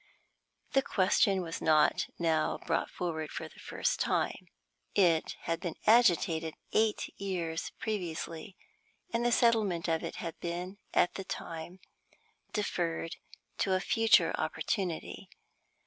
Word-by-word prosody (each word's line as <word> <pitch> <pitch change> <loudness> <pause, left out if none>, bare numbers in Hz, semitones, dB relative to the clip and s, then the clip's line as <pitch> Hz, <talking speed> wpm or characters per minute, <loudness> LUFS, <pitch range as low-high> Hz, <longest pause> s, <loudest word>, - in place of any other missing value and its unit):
The 270 - +4
question 190 -3 +2
was 165 -1 -5
not 155 -1 +4
now 160 -2 +1
brought - - 0
forward 160 -3 -3
for - - -5
the - - -17
first - - -1
time. - - 0 0.5
It 170 -5 +3
had 165 0 -2
been 175 -3 -4
agitated 175 -8 +4 0.2
eight 220 -1 +1
years 170 -4 -2
previously, 175 -3 -4 0.6
and 230 - +1
the 240 - +2
settlement 215 -8 +3
of 165 0 0
it 165 - -4
had 165 -1 -6
been 180 +3 -4
at 175 - +3
that 195 - -7
time 165 +3 -6 0.7
deferred 170 -5 -2 0.4
to 190 -1 +2
a - - +2
future 225 +3 +4
opportunity. 180 -6 -2
175 Hz, 125 wpm, -31 LUFS, 165-205 Hz, 0.7 s, The